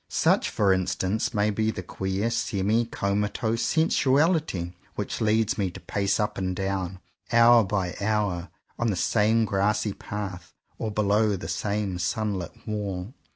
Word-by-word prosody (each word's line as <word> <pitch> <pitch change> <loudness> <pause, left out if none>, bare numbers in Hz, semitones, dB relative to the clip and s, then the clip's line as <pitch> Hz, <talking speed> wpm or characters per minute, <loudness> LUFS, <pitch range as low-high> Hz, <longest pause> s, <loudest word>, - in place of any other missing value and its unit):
Such - - +2
for 100 -2 +3
instance 95 +5 -1
may 105 -2 +1
be 110 +1 0
the 95 - -4
queer 95 +5 -2
semi 110 0 +1
comatose 105 +2 -1
sensuaHty 150 - +2 0.2
which 105 +3 -4
leads 110 0 +2
me 95 -2 +1
to 90 - -10
pace 100 0 -1
up 105 -2 -1
and 95 -1 -1
down, 95 -1 -2 0.3
hour 120 0 +7
by 95 -3 -2
hour, 100 -4 0 0.3
on 120 - +1
the 105 - +1
same 110 +4 +2
grassy 105 +1 +1
path 95 -4 -6 0.2
or 110 - -2
below 105 0 +2
the 85 -4 -6
same 100 +2 -2
sunlit 105 +2 -3
wall. 100 -1 -3
105 Hz, 145 wpm, -26 LUFS, 95-110 Hz, 0.3 s, hour